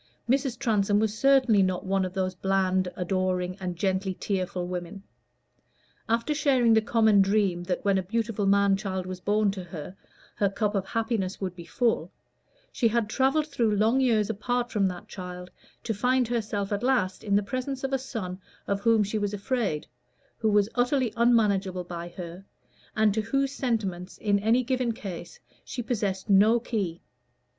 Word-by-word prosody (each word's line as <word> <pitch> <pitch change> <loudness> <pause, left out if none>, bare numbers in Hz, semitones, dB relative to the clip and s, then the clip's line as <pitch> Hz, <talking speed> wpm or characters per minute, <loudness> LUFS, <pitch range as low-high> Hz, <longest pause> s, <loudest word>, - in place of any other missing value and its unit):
Mrs. 260 -1 +1
Transome 210 -5 +2
was 215 0 +1
certainly 260 -5 +4
not 185 -1 0
one 190 0 +1
of 185 - -5
those 185 -1 -1
bland, 190 0 +1
adoring, 185 0 -1
and 180 -2 -4
gently 190 +1 -1
tearful 185 -2 -2
women. 180 +2 -6 1.1
After 230 +6 +1
sharing 265 -6 +3
the 220 - +5
common 220 -2 +4
dream 195 -3 +2
that 180 +1 -2
when 195 -1 +3
a - - 0
beautiful 215 +1 -1
man 200 0 +4
child 190 -2 -3
was 185 0 -6
born 205 +2 +2
to 190 -2 -6
her, 170 +1 -8 0.4
her 200 - +2
cup 205 +1 -1
of 195 -2 -1
happiness 225 -4 -2
would 185 -2 -4
be 170 -2 -10
full, 225 -8 0 0.6
she 235 - +2
had 225 -1 0
travelled 270 +5 +2
through 235 -8 0
long 220 +5 +3
years 225 -5 +3
apart 245 +3 -2
from 200 -3 +2
that 180 +3 -6
child 180 -3 -8 0.3
to 225 - -1
find 250 +4 +1
herself 210 -4 -2
at 205 - -1
last 240 -8 +1
in 200 -2 +1
the 205 - +3
presence 255 +5 -4
of 270 0 -2
a 270 - +2
son 195 -8 -5 0.2
of 200 0 -1
whom 225 -1 +4
she 210 +2 -2
was 205 0 -1
afraid, 205 - -1 0.5
who 220 - +2
was 205 -1 +3
utterly 245 -1 +1
unmanageable 205 -6 +2
by 175 -1 -6
her, 175 +1 -8 0.5
and 215 -1 +3
to 220 - 0
whose 275 +5 0
sentiments 200 -9 -2
in 205 -1 +1
any 225 +5 +2
given 250 -2 0
case 200 - -8 0.2
she 245 - -5
possessed 205 -5 -2
no 210 +4 +5
key. 200 -8 -3
205 Hz, 175 wpm, -27 LUFS, 190-235 Hz, 1.1 s, the